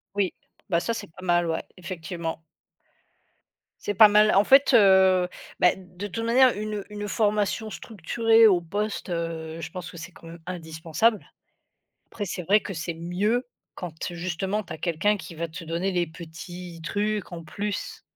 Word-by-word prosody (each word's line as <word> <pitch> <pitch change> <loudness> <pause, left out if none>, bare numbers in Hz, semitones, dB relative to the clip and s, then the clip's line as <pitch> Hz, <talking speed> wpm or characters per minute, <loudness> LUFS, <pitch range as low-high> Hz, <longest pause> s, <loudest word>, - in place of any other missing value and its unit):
Oui, 200 -2 +1 0.4
bah, 170 -3 +3
ça, 230 +6 -1
c'est - - -6
pas 185 +3 -12
mal, 175 -1 +3
ouais, 165 - -1
effectivement. 170 -2 -5 1.4
C'est 205 - 0
pas 215 +3 +9
mal, 210 +1 +5
en 200 +2 +5
fait, 275 +1 +6
heu, 190 -4 +6 0.3
bah, 180 - +6
de 185 +1 -8
toute 225 +4 -4
manière 250 +2 +5
une 210 -1 -4
une 205 0 -5
formation 210 0 0
structurée 225 +3 +3
au 185 -4 +4
poste, 205 +5 -3
heu, 165 -1 -4
je 160 0 -6
pense 180 -1 -7
que - - -11
c'est 170 +2 -9
quand - - -16
même 170 +1 -10
indispensable. 165 +5 -1 0.8
Après 205 - -5
c'est 180 - -4
vrai 200 +5 +4
que 200 - -6
c'est 170 +1 -3
mieux 195 +9 -1 0.3
quand, 175 -3 -7 0.2
justement, 185 +4 -2
tu 185 - -20
as - - -6
quelqu'un 170 +6 +1
qui 190 -3 -9
va 165 +1 -3
te 165 +1 -8
donner 170 +4 -1
les 175 -1 +1
petits 170 +1 -9
trucs 205 +1 -2
en 170 -1 -6
plus. 200 +6 -4
185 Hz, 170 wpm, -26 LUFS, 170-210 Hz, 1.4 s, pas